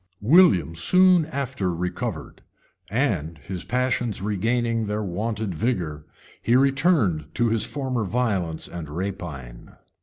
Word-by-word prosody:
] - - -45 0.2
William 90 - +4
soon 180 - +4
after 130 - -2
recovered; 90 +1 -4 0.5
and 100 - -1
his 90 +4 -7
passions 125 -3 -1
regaining 115 +3 0
their 105 +1 -2
wonted 105 +2 -3
vigor, 85 -7 -2 0.3
he 120 - +2
returned 135 - +2
to 120 -1 +2
his 110 0 0
former 130 -1 -2
violence 100 -7 -1
and 85 -4 -7
rapine. 75 -8 -6
105 Hz, 120 wpm, -24 LUFS, 85-125 Hz, 0.5 s, William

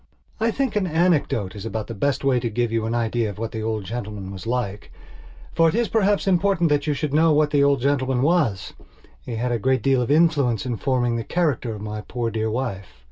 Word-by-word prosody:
I 225 +1 +2
think 260 -1 -1
an 200 -3 +1
anecdote 155 - +1
is 100 - -7
about 110 -1 -4
the 115 - -7
best 140 +7 -1
way 135 -2 +3
to 120 - -2
give 120 +1 -1
you 115 -1 -1
an 115 - -1
idea 115 -1 0
of 100 - -8
what 115 +1 -4
the 110 - -4
old 110 -1 -2
gentleman 105 -2 -6
was 95 +3 -8
like. 115 -4 -3 0.6
For 165 0 +4
it - - -2
is 235 0 +1
perhaps 205 -2 +2
important 190 -2 +2
that 145 0 +1
you 150 - +1
should 145 0 -3
know 160 +1 +4
what 150 0 +2
the 145 -1 +3
old 140 -3 +3
gentleman 130 -2 +1
was; 140 - +1 0.5
he 120 - -5
had 120 +2 -1
a 120 - 0
great 130 +4 +1
deal 135 -2 +3
of 120 - -2
influence 145 -7 +2
in 120 -3 -2
forming 120 -3 0
the 115 - -3
character 140 -8 -1
of 105 - -9
my 105 0 -5
poor 115 +1 -3
dear 110 0 -1
wife. 110 -5 -3
125 Hz, 235 wpm, -23 LUFS, 110-150 Hz, 0.6 s, For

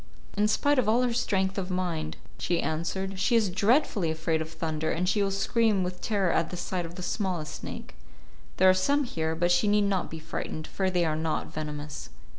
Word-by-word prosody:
"In 210 +1 +3
spite 285 +6 +3
of 230 - +2
all 240 +3 +4
her 245 -1 +1
strength 195 -5 0
of 185 -1 -4
mind," 175 -4 -2 0.2
she 175 - 0
answered, 185 +5 -2
"she 235 +4 +2
is 220 -4 +3
dreadfully 205 - +2
afraid 160 0 0
of 160 - -4
thunder, 160 -1 -2
and 180 +3 0
she 205 +2 +2
will 200 - +2
scream 200 0 +2
with 180 0 -5
terror 200 -5 +1
at 165 0 +1
the 180 - -6
sight 175 -1 -2
of 170 - -12
the 180 - -6
smallest 175 -6 -2
snake. - - -7 0.6
There 190 - +6
are 185 - +8
some 280 +11 +2
here, 160 -9 -2
but 175 +2 +1
she 175 +4 +3
need 205 0 +4
not 195 -3 0
be 160 - -6
frightened, 155 0 -5
for 190 +2 -1
they 180 -2 +1
are 155 -1 0
not 160 0 -2
venomous." 150 - -5
185 Hz, 215 wpm, -28 LUFS, 160-205 Hz, 0.6 s, are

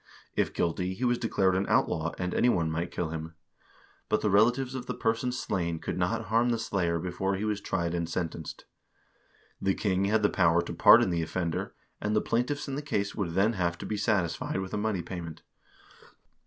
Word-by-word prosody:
If - - +1
guilty 90 +2 -1
he 125 - -5
was 120 -1 +2
declared 95 -5 +1
an 95 +1 0
out - - +3
law, 85 +1 -2
and 90 -1 -2
any 125 - +3
one 85 -8 +1
might 85 +2 -2
kill 85 -3 -3
him; 80 +1 -6 0.7
but 105 - +2
the 105 - +1
relatives 120 +6 +3
of 125 -1 -5
the - - -3
person 115 +2 0
slain 90 -9 -2
could - - -4
not 110 +5 -1
harm 115 +4 +2
the 120 - +1
slayer 95 -7 0
before 95 +3 -2
he 100 +3 -2
was 105 -2 -1
tried 85 -4 -1
and 85 -1 -2
sentenced. 80 -2 -4 1.0
The 95 0 +1
king 95 -2 +1
had 105 +2 +2
the 105 - +5
power 85 -2 +3
to - - -6
pardon - - +7
the 85 -1 0
offender, 85 0 -3 0.3
and 105 +1 0
the - - +5
plaintiffs 135 +6 -1
in 140 - -4
the 140 - -2
case 100 -9 -2
would 85 -5 -3
then 105 +4 +3
have~tcTb~e 90 +2 -2
satisfied 95 -5 0
with 95 -1 -5
a - - 0
money 105 -4 -1
payment. 85 -2 -7
95 Hz, 200 wpm, -29 LUFS, 85-110 Hz, 1.0 s, pardon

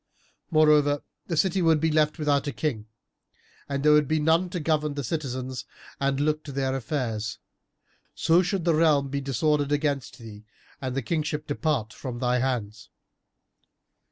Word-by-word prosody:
Moreover, 150 -3 +4 0.2
the 170 - -2
city 190 +2 +2
would 165 -2 +4
be 160 +1 +1
left 150 0 +2
without 145 -2 +1
king 115 -9 -2 0.8
and 140 0 -2
there 150 - +6
would 150 -1 +5
be 155 +2 +1
none 165 +4 +2
to 180 - -3
govern 150 -2 0
the 140 - -3
citizens 130 -2 -4 0.4
and 140 0 0
look 155 +1 0
to 145 - -7
their 135 -1 -1
affairs, 120 -5 -3 0.8
so 165 +2 +4
should 185 -1 -2
the 170 - +4
realm 155 -3 +3
be 140 +1 -2
disordered 145 +2 0
against 145 -3 -1
thee 110 -2 -11 0.4
and 130 -1 -3
the 135 - -1
kingship 155 +1 -2
depart 145 -7 -1
from 125 -3 -6
thy 125 0 +1
hands." 110 -5 -3
145 Hz, 155 wpm, -26 LUFS, 130-155 Hz, 0.8 s, there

